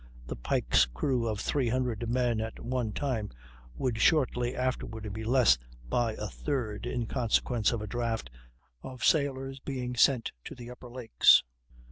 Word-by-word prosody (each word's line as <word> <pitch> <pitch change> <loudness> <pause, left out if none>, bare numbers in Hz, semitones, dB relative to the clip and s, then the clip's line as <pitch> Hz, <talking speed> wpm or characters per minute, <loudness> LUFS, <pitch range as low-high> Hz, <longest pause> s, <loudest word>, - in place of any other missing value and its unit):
The - - -5
Pike's - - +2
crew 115 - -1
of 105 -2 -2
300 125 -3 -1
men 120 -2 +1
at 110 0 -5
one 125 -2 -2
time 115 -4 -2 0.5
would 120 -4 -1
shortly 125 -3 +2
afterward 110 -5 -3
be 110 +1 -5
less 120 - +4 0.3
by 115 - +1
a 105 - -5
third 115 -3 -3
in 120 -2 -2
consequence 120 -1 +1
of 115 -3 -3
a - - -5
draft 115 - -2 0.5
of 130 -1 -8
sailors 135 -3 +1
being 125 -2 -4
sent 125 -1 +3
to - - -7
the 120 -1 -9
upper 125 0 -11
lakes. 120 - +5
120 Hz, 150 wpm, -29 LUFS, 110-130 Hz, 0.5 s, lakes